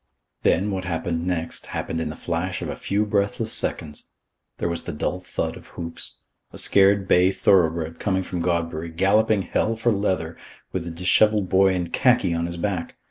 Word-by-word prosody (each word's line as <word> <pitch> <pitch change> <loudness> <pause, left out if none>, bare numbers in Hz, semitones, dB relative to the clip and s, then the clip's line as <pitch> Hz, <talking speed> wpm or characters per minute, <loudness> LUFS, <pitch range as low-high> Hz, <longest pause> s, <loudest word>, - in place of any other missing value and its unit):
Then, 100 +5 +2
what 95 -1 -3
happened 85 0 -2
next, 85 -2 -3
happened 80 - -3
in - - -2
the 75 - -6
flash 90 +3 -3
of - - -4
a - - -3
few 105 +2 0
breathless 100 -1 0
seconds. 75 -2 -3 0.5
There - - -1
was 85 0 -3
the - - -3
dull 75 +4 -2
thud 90 - -3
of - - -13
hoofs. 85 -1 -6 0.3
A - - -10
scared 100 0 +4
bay 90 0 +5
thoroughbred, 85 -4 +2
coming 95 -1 0
from 90 -1 -4
Godbury, 85 -1 -1
galloping 100 +4 +2
hell 115 +4 0
for 115 +1 +1
leather, 100 -4 -1 0.4
with 85 -2 -3
a - - -3
dishevelled 95 +4 +2
boy 95 0 +4
in 90 -2 -2
khaki 120 -9 +3
on 85 0 -1
his 85 0 -6
back. 90 -1 -3
90 Hz, 185 wpm, -24 LUFS, 85-100 Hz, 0.5 s, bay